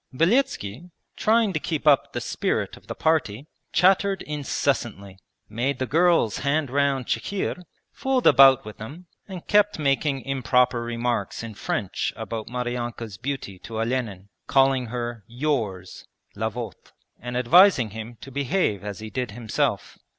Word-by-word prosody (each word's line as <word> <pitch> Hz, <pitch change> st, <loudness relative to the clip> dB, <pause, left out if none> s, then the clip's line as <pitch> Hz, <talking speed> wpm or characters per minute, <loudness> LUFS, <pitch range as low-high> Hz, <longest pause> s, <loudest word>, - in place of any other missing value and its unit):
Beletski, 170 Hz, -, 0 dB, 0.3 s
trying 220 Hz, -2 st, +2 dB
to 155 Hz, -, 0 dB
keep 155 Hz, -1 st, -3 dB
up 145 Hz, -3 st, +4 dB
the -, -, -3 dB
spirit -, -, -2 dB
of -, -, -19 dB
the -, -, -5 dB
party, 145 Hz, -6 st, 0 dB, 0.3 s
chattered 195 Hz, +2 st, +3 dB
incessantly, 120 Hz, -9 st, -2 dB, 0.3 s
made 125 Hz, +5 st, -1 dB
the 130 Hz, -, -1 dB
girls 165 Hz, -, +2 dB
hand 140 Hz, -1 st, 0 dB
round 140 Hz, -2 st, +1 dB
chikhir, 180 Hz, -, -2 dB, 0.3 s
fooled 265 Hz, -2 st, -1 dB
about 135 Hz, -1 st, +7 dB
with 105 Hz, -, -10 dB
them, 145 Hz, +12 st, -9 dB, 0.2 s
and 185 Hz, -4 st, -8 dB
kept 210 Hz, 0 st, +3 dB
making 140 Hz, -2 st, 0 dB
improper 125 Hz, -2 st, +2 dB
remarks 120 Hz, 0 st, -2 dB
in 115 Hz, -1 st, -7 dB
French 100 Hz, -1 st, -2 dB
about 110 Hz, -2 st, -5 dB
Maryanka's 120 Hz, -4 st, -4 dB
beauty 125 Hz, -7 st, -5 dB
to 110 Hz, +3 st, -6 dB
Olenin, 110 Hz, -5 st, -2 dB, 0.2 s
calling 135 Hz, -2 st, +3 dB
her 120 Hz, -1 st, -5 dB
'yours' 115 Hz, -8 st, -3 dB, 0.3 s
(la 110 Hz, +2 st, -1 dB
votre), 115 Hz, +1 st, -8 dB, 0.3 s
and 120 Hz, 0 st, -4 dB
advising 130 Hz, -, +5 dB
him 110 Hz, +2 st, -8 dB
to 135 Hz, -, -10 dB
behave 140 Hz, -, 0 dB
as 105 Hz, 0 st, -6 dB
he 110 Hz, 0 st, -7 dB
did 125 Hz, 0 st, -2 dB
himself. 115 Hz, +1 st, -2 dB
125 Hz, 145 wpm, -24 LUFS, 115-150 Hz, 0.3 s, about